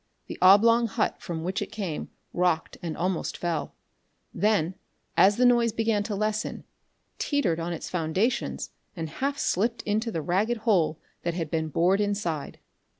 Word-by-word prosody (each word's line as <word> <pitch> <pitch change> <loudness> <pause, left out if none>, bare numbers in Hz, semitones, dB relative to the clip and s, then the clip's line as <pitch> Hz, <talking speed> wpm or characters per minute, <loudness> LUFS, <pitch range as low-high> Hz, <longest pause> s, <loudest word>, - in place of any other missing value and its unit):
The - - -8
oblong 230 +5 +6
hut 215 +1 -1
from 165 -3 -4
which 185 +2 -2
it - - -4
came 190 -8 -4 0.2
rocked 175 -2 +1
and 165 -3 -4
almost 180 -1 -1
fell; 170 -2 -2 0.6
then, 195 -3 +2 0.4
as 200 +2 +5
the 250 - +4
noise 240 -2 +4
began 225 -1 +1
to 210 - -2
lessen, 215 +1 -2 0.6
teetered 210 - +1
on 170 +1 -3
its 165 - -5
foundations 185 +8 -1 0.2
and 165 -2 -3
half 275 - -2
slipped 230 +2 0
into 220 +2 0
the 165 -6 -3
ragged 205 +8 +1
hole 170 -8 +3 0.2
that 170 -1 -2
had 165 -4 -3
been 160 -1 0
bored 180 +6 +3
inside. 200 -8 -2
190 Hz, 155 wpm, -27 LUFS, 170-220 Hz, 0.6 s, oblong